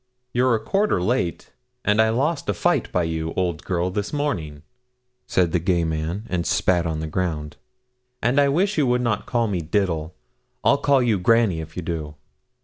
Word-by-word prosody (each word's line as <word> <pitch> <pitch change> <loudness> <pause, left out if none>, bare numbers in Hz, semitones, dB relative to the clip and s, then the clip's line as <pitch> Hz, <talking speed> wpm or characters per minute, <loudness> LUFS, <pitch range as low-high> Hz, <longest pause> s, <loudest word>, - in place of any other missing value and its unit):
'You're 125 0 +3
a - - -1
quarter 195 - +1
late, 90 -2 -1 0.3
and 105 +1 +4
I 110 - +3
lost 140 +4 0
a 100 - +1
fight 60 -7 +1
by 90 - +1
you, 80 0 -3
old 85 -4 -1
girl, 90 0 -1
this 100 +1 -3
morning,' 85 - -3 0.6
said 90 -3 +2
the 90 - +2
gay 85 0 +1
man, 80 +6 -3
and 90 -2 -1
spat 85 0 +1
on 80 -1 -2
the 80 - -3
ground; 80 -3 -3 0.6
'and 125 +5 +3
I 140 - +3
wish 185 +5 +1
you 140 - +3
would 125 0 +2
not 115 -4 -1
call 120 -2 +1
me 95 -4 -1
Diddle. 80 -1 -1 0.5
I'll 140 - +4
call 140 -3 +3
you 110 -5 +2
Granny 110 -3 +3
if 80 +1 -10
you 90 - -3
do.' 80 -3 -4
90 Hz, 190 wpm, -23 LUFS, 80-120 Hz, 0.6 s, and